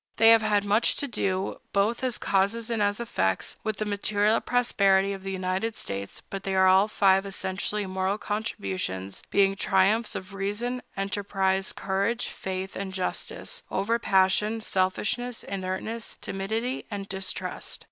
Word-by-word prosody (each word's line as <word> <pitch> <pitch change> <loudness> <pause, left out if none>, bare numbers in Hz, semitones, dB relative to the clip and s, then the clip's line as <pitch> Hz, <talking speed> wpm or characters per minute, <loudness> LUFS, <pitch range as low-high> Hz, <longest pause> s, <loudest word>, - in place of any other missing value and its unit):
They 225 +1 +7
have 225 -1 +8
had 210 -2 +2
much 210 +3 +3
to 285 - -1
do, 190 -5 -1
both 215 +6 +1
as 255 -3 +1
causes 220 +4 +1
and 225 -2 0
as 205 +1 +1
effects, 95 - -1
with 215 -1 -2
the 215 - -1
material 205 +1 +2
prosperity 200 -5 +3
of 195 - -7
the 195 0 -4
United 190 +4 -1
States; 100 0 -6
but 195 - -5
they 195 -1 -1
are 190 0 +5
all 190 +2 +6
five 195 -2 +4
essentially 195 +1 -2
moral 190 +1 -1
contributions, 95 - -3
being 195 -1 +3
triumphs 200 +4 +2
of 185 +2 -6
reason, 210 +6 -2 0.2
enterprise, 195 -1 0
courage, 200 +5 -1
faith, 190 0 -5
and 190 -1 -4
justice, 335 - -3
over 230 +4 0
passion, 205 +2 +3
selfishness, 220 +5 0
inertness, 195 +4 -4
timidity, 220 +7 -3
and 200 -2 -5
distrust. 190 -1 -3
200 Hz, 145 wpm, -27 LUFS, 190-220 Hz, 0.2 s, have